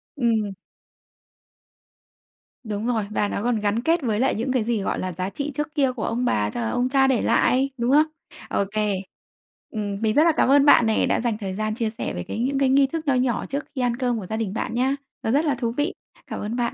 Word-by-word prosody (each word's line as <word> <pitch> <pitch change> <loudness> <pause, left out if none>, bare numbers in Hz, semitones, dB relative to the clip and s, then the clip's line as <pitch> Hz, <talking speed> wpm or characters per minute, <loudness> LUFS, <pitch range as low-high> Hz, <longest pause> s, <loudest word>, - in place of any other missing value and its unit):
Ừm. 225 -6 +1 2.1
Đúng 215 0 -4
rồi. 225 -4 +1
Và 210 -1 0
nó 205 - -3
còn 240 -3 +1
gắn 210 +2 0
kết 330 +4 +2
với 220 -5 0
lại 265 - +2
những 240 +4 -2
cái 250 -4 +1
gì, 225 -3 -1
gọi - - -2
là, 185 - -3
giá 185 +3 -3
trị 285 +5 -4
trước 300 +1 -3
kia 275 -4 +3
của 245 -3 -6
ông 240 +2 -1
bà 105 - +1
cho 120 - -4
là 110 - -1
ông 245 - 0
cha 270 0 +4
để 260 -4 +2
lại, 260 +3 +2
đúng 240 +1 0
không? 300 +2 +6 0.4
Ô - - +1
kê. 210 -1 0 0.8
Ừm, 205 -2 -3
mình 215 -1 +2
rất 305 - +6
là 335 - +5
cảm 300 - +2
ơn 280 +1 +6
bạn 240 - +7
nè, 220 - +2
đã - - +1
dành 230 -3 -1
thời 195 -3 -4
gian 215 +1 -2
chia 230 -2 -1
sẻ 225 +2 -5
về 90 - -4
cái - - -5
những 270 +3 0
cái 270 - +3
nghi 275 +1 +5
thức 315 +1 -5
nho 275 - +4
nhỏ 250 -2 0
trước 280 +2 -4
khi 260 - -1
ăn 240 -1 +1
cơm 245 -3 0
của 195 - -7
gia 220 +4 -3
đình 215 -4 -2
bạn 225 - -3
nhá. 260 +3 +1 0.3
Nó 225 - 0
rất 295 +5 +2
là 290 - +1
thú 235 -2 -2
vị! 290 +8 -1 0.3
Cảm - - -5
ơn 215 +3 -3
bạn. 240 -1 -1
240 Hz, 255 wpm, -23 LUFS, 215-270 Hz, 2.1 s, bạn